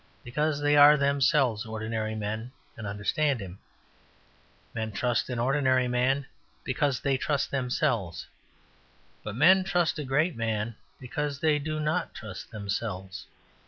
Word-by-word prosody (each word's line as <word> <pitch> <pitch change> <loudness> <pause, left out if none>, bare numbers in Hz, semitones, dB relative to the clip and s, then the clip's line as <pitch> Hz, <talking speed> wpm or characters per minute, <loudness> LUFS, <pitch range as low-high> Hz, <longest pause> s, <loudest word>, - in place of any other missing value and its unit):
because 150 +4 -1
they 145 0 +3
are 145 +1 +8
themselves 140 -4 +2
ordinary 110 0 -3
men 110 +3 -4 0.2
and 110 -2 -7
understand 120 +7 0
him. 95 -2 -8 1.1
Men 110 -1 -3
trust 120 +4 0
an 125 - -3
ordinary 130 0 +2
man 130 +3 +1 0.4
because 135 0 0
they 135 -2 +1
trust 140 +1 -1
themselves. 125 - -1 1.0
But 105 -1 -5
men 185 +9 +6
trust 175 -4 0
a - - -2
great 145 +5 +1
man 110 -1 -2 0.2
because 140 +2 -3
they 155 -1 +2
do 155 +1 -3
not 155 +4 -1
trust 110 -5 -8
themselves. 100 -3 -5
130 Hz, 130 wpm, -28 LUFS, 110-145 Hz, 1.1 s, are